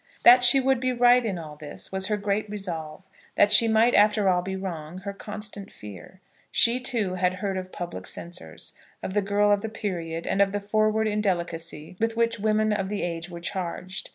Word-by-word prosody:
That 245 +1 +8
she 245 +2 +6
would 265 -1 +2
be 255 0 0
right 245 0 +4
in 205 -5 -2
all 155 -3 -8
this, 150 0 -8
was 190 0 0
her 210 - 0
great 205 +1 -2
resolve; 175 -5 -5 0.3
that 205 - +4
she 225 +2 +8
might 225 +2 +3
after 210 -1 +4
all 180 -1 +2
be 190 +1 -5
wrong, 175 -3 -6
her 200 0 -5
constant 210 0 -7
fear. 105 - -12 0.3
She, 240 +2 +3
too, 230 -7 -1
had 180 0 0
heard 195 0 -3
of 185 0 -5
public 135 - -7
censors, 170 - -8 0.3
of 185 - -4
the 205 - +2
girl 205 +1 +2
of 205 -1 +2
the 220 - -4
period, 170 -6 -4
and 195 - 0
of 200 0 +2
the 205 - -1
forward 215 +1 +1
indelicacy 170 -6 -3
with 225 0 -1
which 230 -1 +1
women 215 0 +1
of 195 -2 -2
the 205 0 -3
age 170 0 -4
were 170 -1 -9
charged. 185 +1 -5
200 Hz, 205 wpm, -25 LUFS, 175-215 Hz, 0.3 s, That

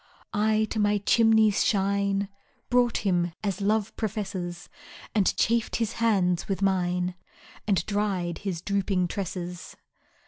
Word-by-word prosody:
I 215 +1 +2
to 220 - -1
my 205 0 +3
chimney's 220 0 +4
shine 200 0 +1 0.4
Brought 245 -3 +2
him, 175 -3 +1
as 200 -1 -2
Love 210 +1 0
professes, 195 -5 -4 0.5
And 205 -4 +2
chafed 230 0 +1
his 225 -2 -1
hands 185 -6 +2
with 195 0 -2
mine, 180 -1 +1 0.5
And 190 -5 +2
dried 195 -5 -1
his 185 -5 -4
drooping 195 -3 0
tresses. 180 -2 -5
200 Hz, 125 wpm, -27 LUFS, 180-215 Hz, 0.5 s, chimney's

